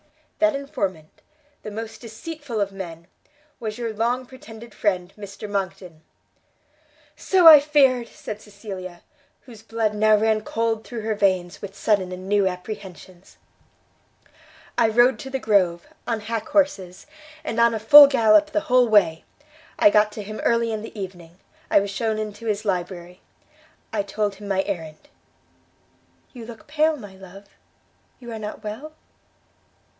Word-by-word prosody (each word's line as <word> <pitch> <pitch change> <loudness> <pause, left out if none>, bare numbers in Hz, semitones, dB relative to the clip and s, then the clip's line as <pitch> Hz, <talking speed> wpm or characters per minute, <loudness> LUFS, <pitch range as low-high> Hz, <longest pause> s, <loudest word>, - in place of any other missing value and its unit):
"That 315 -2 +3
informant 195 - -5 0.4
the - - -7
most 220 +1 -7
deceitful 245 +2 -7
of 200 -1 -1
men! 170 -4 -8 0.5
was 215 -2 -5
your 230 -2 -4
long 240 +4 -1
pretended 235 -3 -13
friend, 185 -3 -1
Mr 205 0 -9
Monckton!" 190 -4 -5 1.1
"So 370 -2 +2
I 310 -2 +12
feared!" 275 -5 +3
said 215 0 -8
Cecilia, 195 -4 -9 0.4
whose 230 -5 -14
blood 225 -1 -2
now 215 +1 +4
ran 220 0 +1
cold 225 0 -2
through 235 -2 -7
her 220 0 -1
veins 185 -4 0
with 195 -1 -8
sudden 195 -2 0
and 185 +1 -8
new 200 -1 +2
apprehensions. 185 -1 -8 1.4
"I 235 - +3
rode 240 +4 +4
to 265 - -7
the 265 - -2
Grove, 190 -8 +1 0.2
on 230 -2 -1
hack 220 0 -4
horses, 200 -12 0 0.4
and 230 -7 -3
on 235 0 +4
a - - -3
full 285 +7 +10
gallop 270 +2 +4
the 310 0 -1
whole 250 -2 +3
way. 175 -7 +3 0.5
I 205 - +5
got 210 0 +3
to 210 - -6
him 215 +2 -8
early 230 -1 +1
in 215 -1 -3
the 220 -1 -9
evening. 175 -3 -9 0.3
I - - +5
was 200 0 -3
shewn 220 +2 -1
into 215 +1 -6
his 210 0 -2
library. 180 -2 -4 0.7
I 210 - +1
told 205 +1 -2
him 205 +1 -10
my 195 -1 0
errand. 170 - -6 1.2
You 235 -3 -10
look 230 -2 -11
pale, 310 +1 +1
my 205 -6 -11
love? 190 +1 -13 0.7
You 240 -2 -10
are 225 - -6
not 210 0 -7
well? 225 +9 -7
215 Hz, 150 wpm, -23 LUFS, 195-235 Hz, 1.4 s, I